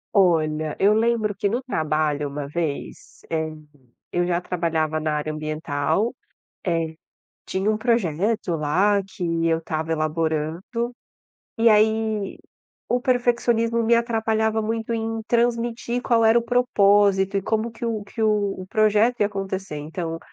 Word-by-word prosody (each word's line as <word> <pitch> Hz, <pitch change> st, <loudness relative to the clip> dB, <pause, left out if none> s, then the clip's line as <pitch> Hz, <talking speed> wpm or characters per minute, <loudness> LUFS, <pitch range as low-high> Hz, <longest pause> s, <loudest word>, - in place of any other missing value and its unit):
Olha, 155 Hz, -5 st, +2 dB
eu 205 Hz, +2 st, +5 dB
lembro 220 Hz, -1 st, +1 dB
que 200 Hz, 0 st, -1 dB
no 240 Hz, +5 st, -2 dB
trabalho 155 Hz, -, 0 dB
uma 140 Hz, 0 st, -5 dB
vez, 155 Hz, -2 st, -5 dB
eh, 160 Hz, -1 st, 0 dB, 0.6 s
eu 175 Hz, 0 st, 0 dB
já 175 Hz, -1 st, +1 dB
trabalhava 165 Hz, -3 st, -1 dB
na 155 Hz, 0 st, -1 dB
área 150 Hz, +1 st, -2 dB
ambiental. 155 Hz, -, -1 dB, 0.5 s
Eh, 165 Hz, -3 st, -1 dB, 0.5 s
tinha 190 Hz, +3 st, 0 dB
um 215 Hz, -, 0 dB
projeto 210 Hz, -4 st, 0 dB
lá 190 Hz, +7 st, +2 dB
que 165 Hz, -2 st, -2 dB
eu 165 Hz, 0 st, +2 dB
estava 160 Hz, 0 st, -3 dB
elaborando. 160 Hz, -, -2 dB, 0.7 s
E 230 Hz, 0 st, +5 dB
aí 220 Hz, -1 st, +2 dB, 0.5 s
o 245 Hz, -, +2 dB
perfeccionismo 235 Hz, -2 st, +1 dB
me 235 Hz, +1 st, +3 dB
atrapalhava 220 Hz, -1 st, +1 dB
muito 225 Hz, +1 st, -2 dB
em 225 Hz, 0 st, -2 dB
transmitir 235 Hz, 0 st, 0 dB
qual 230 Hz, -2 st, +3 dB
era 225 Hz, +2 st, +6 dB
o -, -, -4 dB
propósito, 205 Hz, -5 st, +3 dB
e -, -, 0 dB
como 220 Hz, +1 st, 0 dB
que 235 Hz, -, -6 dB
o 220 Hz, -3 st, -2 dB
que 220 Hz, +2 st, -4 dB
o 205 Hz, -3 st, 0 dB
projeto 215 Hz, +3 st, +3 dB
ia 205 Hz, -, +3 dB
acontecer. 195 Hz, -4 st, -4 dB
Então, 165 Hz, +2 st, -4 dB
200 Hz, 140 wpm, -23 LUFS, 160-225 Hz, 0.7 s, era